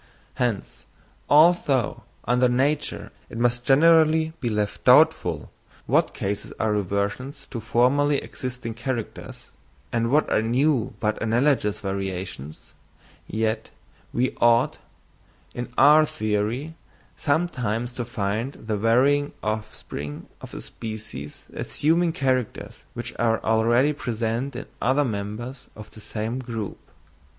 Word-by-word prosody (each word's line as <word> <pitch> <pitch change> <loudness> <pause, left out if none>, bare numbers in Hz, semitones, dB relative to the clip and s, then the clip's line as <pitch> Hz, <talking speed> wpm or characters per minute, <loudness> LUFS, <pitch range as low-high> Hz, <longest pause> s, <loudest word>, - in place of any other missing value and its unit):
Hence, 120 -5 -2 0.4
although 150 -6 +4 0.2
under 125 +2 +3
nature 140 +4 0 0.2
it - - -8
must 120 +1 +1
generally 160 +3 +5
be 120 - -1
left 105 -2 -2
doubtful, - - +4 0.3
what - - +2
cases 100 +1 -3
are 110 - +1
reversions 100 +7 -2
to 120 - -4
formerly 130 +6 +2
existing 125 -4 -5
characters, 120 -1 -5 0.4
and 115 0 +1
what 150 +4 +3
are - - +3
new 125 +2 +1
but 105 0 -1
analogous 115 -2 +1
variations, 95 -6 -5 0.5
yet 110 +1 -1 0.4
we 125 +2 0
ought, 120 0 +4 0.8
on 120 0 -4
our 150 +2 +7
theory, 110 +8 -2 0.4
sometimes 125 -7 -1
to 120 - -3
find 115 +2 -2
the 110 -1 -4
varying 135 +6 +3
offspring 110 -9 -5 0.2
of - - -10
a - - -6
species 105 -10 -8
assuming 165 +3 +1
characters 130 -7 -2
which - - -5
are 115 -1 +2
already 120 +6 +3
present 120 0 -2
in 125 - -5 0.2
other 135 +4 +3
members 110 +4 -5
of 105 0 -11
the 110 - -13
same 110 +4 -4
group. 115 -5 -5
120 Hz, 115 wpm, -24 LUFS, 110-135 Hz, 0.8 s, our